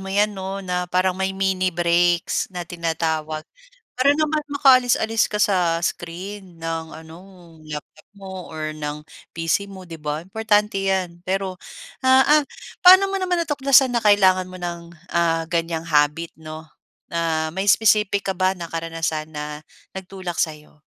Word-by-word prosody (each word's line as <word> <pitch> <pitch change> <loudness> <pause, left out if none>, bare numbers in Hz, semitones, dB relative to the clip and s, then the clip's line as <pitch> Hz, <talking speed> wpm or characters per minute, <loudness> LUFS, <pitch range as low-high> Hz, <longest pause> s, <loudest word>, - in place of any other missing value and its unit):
mo 190 - -7
iyan 205 +2 +2
no 195 0 -6
na 180 0 -2
parang 185 +1 +2
may 190 +1 -3
mini 190 -1 +1
breaks 175 0 +1
na 180 -2 -6
tinatawag 160 -2 -3 0.5
para 270 +3 +4
naman 305 0 0
makaalis-alis 250 -5 +4
ka 210 - -3
sa 180 -5 +2
screen 180 +1 -5
ng 165 0 -3
ano 160 0 -11 0.5
laptop 155 0 -9
mo 190 -2 -9
or 155 -1 -4
ng 150 0 -5 0.3
PC 165 +4 0
mo, 190 -1 -10
'di 165 - -7
ba? 150 -1 -4
Importante 210 +2 0
iyan. 180 -3 -2
Pero, 190 0 -2 0.5
ah, 260 0 +6
ah, 300 0 +6 0.4
paano 375 +2 +9
mo 390 - -2
naman 365 -2 0
natuklasan 275 -4 +3
na 235 - -1
kailangan 190 -3 +4
mo 185 - -9
ng, 170 -1 -6 0.2
ah, 165 -1 +1
ganyang 165 -1 -2
habit 150 +2 +1
no? 155 0 -10 0.4
Ah, 165 -1 -1
may 190 - -1
specific 210 -1 +4
ka 190 -1 -2
ba 185 +1 +2
na 175 -3 -7
karanasan 165 -2 -3
na 150 0 -6 0.3
nagtulak 185 -2 -6
sa 160 - +1
iyo? 150 0 -18
180 Hz, 155 wpm, -22 LUFS, 165-200 Hz, 0.5 s, paano